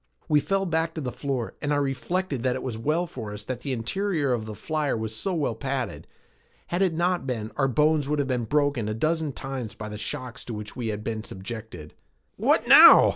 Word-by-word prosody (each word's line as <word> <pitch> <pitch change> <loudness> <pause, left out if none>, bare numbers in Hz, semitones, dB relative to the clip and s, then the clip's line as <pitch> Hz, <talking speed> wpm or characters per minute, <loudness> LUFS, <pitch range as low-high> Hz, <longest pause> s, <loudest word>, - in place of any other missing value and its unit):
We 150 -3 +4
fell 195 +5 0
back 165 -1 0
to 160 - -3
the 125 -3 -3
floor 135 -4 -3
and 145 - -1
I - - +3
reflected 145 +2 -1
that 125 0 +1
it 130 - -4
was 125 -4 -3
well 150 +10 0
for 110 -11 -7
us 105 - -8
that 125 0 -4
the 140 - -3
interior 145 - 0
of 110 -3 -2
the 110 - -6
flyer 150 +3 -1
was 110 0 -4
so 185 - -1
well 145 -7 0
padded. 130 +3 -3 0.6
Had 175 +2 0
it 185 -4 +2
not 175 -3 +1
been, 110 -3 -3
our 135 -2 +2
bones 150 +2 +2
would 150 - +1
have 140 -2 0
been 125 -3 -1
broken 145 -4 +1
a 110 - -2
dozen 155 +4 0
times 130 -5 -5
by 105 0 -6
the 105 0 -6
shocks 125 +2 -5
to 115 - -5
which 105 0 -7
we 120 -2 -3
had 105 -1 -3
been 110 -1 -3
subjected. 95 -7 -8 0.4
"What - - +2
now?" - - +10
135 Hz, 225 wpm, -26 LUFS, 110-155 Hz, 0.6 s, now